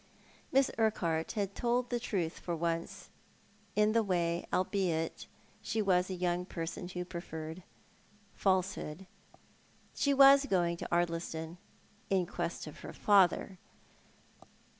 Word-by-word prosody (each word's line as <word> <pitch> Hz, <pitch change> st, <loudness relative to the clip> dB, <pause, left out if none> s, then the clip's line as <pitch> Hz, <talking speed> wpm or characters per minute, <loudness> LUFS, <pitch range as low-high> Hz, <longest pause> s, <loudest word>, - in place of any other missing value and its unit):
Miss 270 Hz, 0 st, +3 dB
Urquhart 170 Hz, -7 st, 0 dB
had 200 Hz, -3 st, -2 dB
told 245 Hz, +2 st, 0 dB
the 240 Hz, -, 0 dB
truth 185 Hz, -8 st, -2 dB
for 175 Hz, -, -3 dB
once 165 Hz, 0 st, -3 dB, 0.6 s
iu 210 Hz, 0 st, +4 dB
the 230 Hz, -, +4 dB
way, 175 Hz, -4 st, 0 dB
albeit 180 Hz, -4 st, -1 dB, 0.3 s
she 225 Hz, -, -2 dB
was 185 Hz, -3 st, +2 dB
a 190 Hz, -, -3 dB
young 180 Hz, 0 st, 0 dB
person 175 Hz, -1 st, -5 dB
who 180 Hz, 0 st, -5 dB
preferred 165 Hz, -1 st, -7 dB, 0.7 s
falsehood. 190 Hz, -3 st, -1 dB, 0.9 s
iShe 280 Hz, -1 st, +1 dB
was 275 Hz, 0 st, +8 dB
going 175 Hz, -5 st, +1 dB
to -, -, -6 dB
Ardlistou 165 Hz, -1 st, -1 dB, 0.3 s
— 205 Hz, -, -32 dB
iu 190 Hz, -2 st, +2 dB
quest 170 Hz, -, -4 dB
of 155 Hz, -, -10 dB
her -, -, -8 dB
father. 190 Hz, -2 st, +3 dB
180 Hz, 125 wpm, -32 LUFS, 170-205 Hz, 0.9 s, was